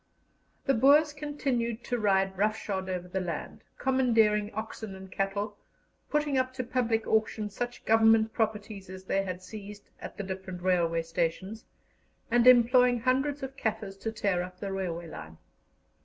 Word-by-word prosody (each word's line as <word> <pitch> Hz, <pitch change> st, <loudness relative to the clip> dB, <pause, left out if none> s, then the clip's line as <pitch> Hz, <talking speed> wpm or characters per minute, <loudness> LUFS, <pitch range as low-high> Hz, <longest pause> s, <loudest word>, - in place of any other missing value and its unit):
The 275 Hz, -, +3 dB
Boers 290 Hz, +5 st, +5 dB
continued 270 Hz, -6 st, -2 dB
to 245 Hz, -, -2 dB
ride 195 Hz, -2 st, +2 dB
roughshod 200 Hz, -2 st, -1 dB
over 180 Hz, -1 st, -3 dB
the 190 Hz, +1 st, -2 dB
land, 170 Hz, -4 st, -5 dB
commandeering 225 Hz, -5 st, +2 dB
oxen 220 Hz, -2 st, -6 dB
and 190 Hz, 0 st, -11 dB
cattle, 200 Hz, +2 st, -2 dB, 0.5 s
putting 295 Hz, -3 st, +1 dB
up 255 Hz, 0 st, -2 dB
to 255 Hz, -, -2 dB
public 235 Hz, -2 st, 0 dB
auction 215 Hz, -1 st, 0 dB
such 245 Hz, +3 st, -5 dB
Government 225 Hz, 0 st, +4 dB
properties 210 Hz, -3 st, -2 dB
as 190 Hz, 0 st, -9 dB
they 195 Hz, +1 st, 0 dB
had 185 Hz, -1 st, -5 dB
seized 205 Hz, +1 st, -10 dB
at -, -, -9 dB
the 205 Hz, -, -3 dB
different 190 Hz, -2 st, -6 dB
railway 170 Hz, -3 st, +2 dB
stations, 180 Hz, +7 st, -3 dB, 0.7 s
and 240 Hz, +1 st, +4 dB
employing 245 Hz, 0 st, +6 dB
hundreds 270 Hz, +3 st, +1 dB
of 265 Hz, 0 st, -5 dB
Kaffirs 210 Hz, -5 st, -3 dB
to 225 Hz, +3 st, -4 dB
tear 200 Hz, -5 st, 0 dB
up 180 Hz, 0 st, -8 dB
the 195 Hz, 0 st, -4 dB
railway 175 Hz, -3 st, -3 dB
line. 80 Hz, -, -9 dB
215 Hz, 155 wpm, -29 LUFS, 190-245 Hz, 0.7 s, employing